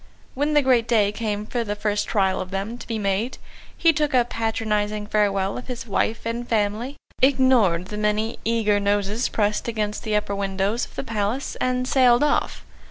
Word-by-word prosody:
When 295 +3 0
the 295 - +5
great 245 -3 +3
day 210 -4 +3
came 210 -1 -3
for 235 +2 -2
the 205 -2 -3
first 210 0 -1
trial 190 -3 +1
of 185 - -6
them 195 +4 -3
to - - -10
be 225 - -2
made, 205 +4 -1 0.4
he 330 -1 +4
took 300 -2 0
a 245 -1 +4
patronising 215 -2 -1
farewell 200 -1 0
of 250 - -12
his 245 -2 -5
wife 225 +2 -1
and 235 +1 -3
family, 220 +5 0 0.3
ignored 250 -10 +3
the 210 - -5
many 210 +2 0
eager 220 -2 +2
noses 205 +3 0
pressed 210 0 0
against 215 -2 -2
the 215 -1 -1
upper 210 -1 0
windows 200 +3 -1
of - - -19
the - - -3
Palace, 225 +2 -2
and 255 0 0
sailed 255 -1 +4
off. 295 - 0
215 Hz, 185 wpm, -23 LUFS, 205-245 Hz, 0.4 s, the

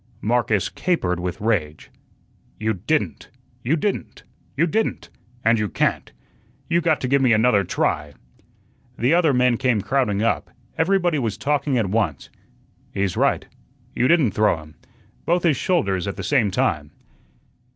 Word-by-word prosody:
Marcus 110 -3 +1
capered 95 - -1
with 90 0 -4
rage. 85 -9 -2 0.7
"You 110 +1 0
didn't! 120 - -2 0.3
you 135 +7 +2
didn't! 195 +5 -3 0.3
you 165 - +4
didn't! 220 +7 -2 0.4
and 115 0 +4
you 105 -1 -1
can't! - - -1 0.6
You 170 0 +2
got 160 -2 +1
to 130 - -1
give 140 +2 +2
me 125 -3 +4
another 110 -2 +3
try." 75 -4 -2 0.8
The 125 +7 +2
other 170 -3 +4
men 125 -2 +2
came 125 -4 +1
crowding 110 -4 0
up. 115 - 0 0.3
Everybody 175 -2 +1
was 110 -4 -2
talking 145 -1 0
at 105 -5 0
once. 105 -10 -1 0.6
"He's 100 -2 -1
right." - - +1 0.5
"You 125 - +1
didn't 155 -9 +3
throw 105 -5 +2
him." 75 -1 -13 0.5
"Both 175 +1 +2
his 165 -5 +3
shoulders 100 - 0
at 100 - -3
the - - -6
same 125 -8 +2
time." 75 -5 -1
120 Hz, 150 wpm, -22 LUFS, 100-150 Hz, 0.8 s, you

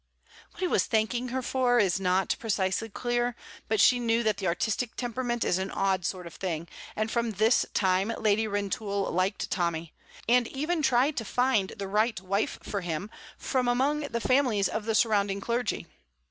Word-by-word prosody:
What - - -12
he 365 - +2
was - - +2
thanking 235 +2 0
her 255 +1 -3
for 250 -1 +2
is 195 -5 +3
not 185 0 +1
precisely 205 0 -1
clear, 240 +2 -1 0.3
but 220 -1 0
she 245 +4 +6
knew 230 0 +1
that 215 -2 +1
the 190 - -2
artistic 220 +7 -1
temperament 245 -1 -2
is 180 - +1
an 190 +1 -2
odd 190 -3 0
sort 185 -2 -4
of 170 - -9
thing, 170 -3 -4 0.3
and 215 +1 -1
from 235 -2 0
this 220 +4 +3
time 190 +2 +2
Lady 220 0 +2
Rintoul 200 0 -2
liked 185 +3 -1
Tommy, 170 -3 -1 0.3
and 240 0 +4
even 310 +6 -2
tried 265 +2 +2
to 225 - -1
find 235 -4 +1
the 200 -1 -4
right 215 +2 +1
wife 195 +3 -1
for 200 - -3
him 175 +4 -4 0.4
among 260 +3 +2
the 285 -6 -3
families 245 -6 +2
of 220 -1 -4
the 225 -1 0
surrounding 205 -3 +2
clergy. 235 -2 -2
220 Hz, 175 wpm, -28 LUFS, 195-245 Hz, 0.4 s, she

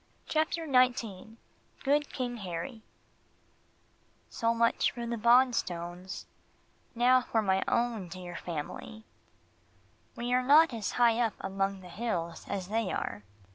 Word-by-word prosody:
CHAPTER 320 +1 0
XIX 245 -6 +1 0.5
GOOD 290 +1 +2
KING 245 -2 -3
HARRY 195 +4 -5 1.5
So 230 -1 +1
much 230 0 +2
for 235 0 -6
the 235 0 -2
Bonstones 190 -7 +1 0.7
now 250 +2 +5
for 225 -3 0
my 190 -1 +2
own 235 -5 0
dear 180 0 -8
family. 175 +7 -6 1.1
We 240 +1 -2
are 250 - +4
not 295 +3 +6
as 220 -3 -3
high 235 -1 +4
up 230 -3 +2
among 195 0 -2
the 180 - -11
hills 170 -5 -3
as 190 -2 -3
they 220 -2 0
are. 100 +1 -3
230 Hz, 125 wpm, -30 LUFS, 190-245 Hz, 1.5 s, not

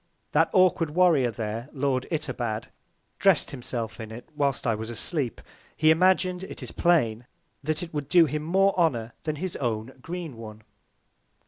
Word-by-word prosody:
That - - +3
awkward 185 -4 +4
Warrior 165 -9 +4
there, 115 +3 -4
Lord 135 -2 0
Itobad, 120 -9 -3 0.5
dress'd - - +3
himself 120 -4 -5
in 110 -1 -6
it 120 +2 -9
whilst 140 -3 0
I 115 - +3
was 110 +1 -5
asleep. 125 +2 -2 0.4
He 155 0 +5
imagin'd, 185 +1 +3
it - - -8
is - - -6
plain, 125 -10 +2 0.3
that 155 +3 -2
it 170 - -8
would 145 -2 -4
do 175 -2 +7
him 150 +1 -2
more 195 +5 +3
Honour 120 -9 +1
than 155 -1 -1
his 180 +3 -4
own 115 0 -2
Green 165 -4 -6
one. 110 -1 -10
140 Hz, 160 wpm, -26 LUFS, 115-170 Hz, 0.5 s, do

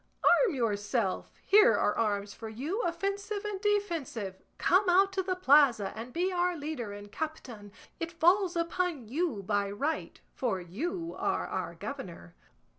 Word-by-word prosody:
Arm 440 - +5
yourself; 210 -3 -1
here 425 +4 +6
are - - +1
arms 205 -2 -1
for 225 - -8
you, 290 - -3
offensive 400 +3 -2
and 405 -2 -4
defensive; 335 - -1 0.2
come 370 +2 +3
out 390 +2 +4
to 380 - +1
the 370 0 -1
plaza 275 - +4
and 230 +3 -7
be 360 +6 0
our 355 -1 0
leader 285 -8 -4
and 205 0 -9
captain; 245 -10 -6 0.3
it 330 0 -3
falls 355 +3 +3
upon 335 -6 -1
you 265 - -1
by 205 0 0
right, 280 +11 -3
for 230 -7 -1
you 330 - -4
are - - 0
our - - -4
governor." 175 - -7
310 Hz, 150 wpm, -30 LUFS, -, 0.3 s, here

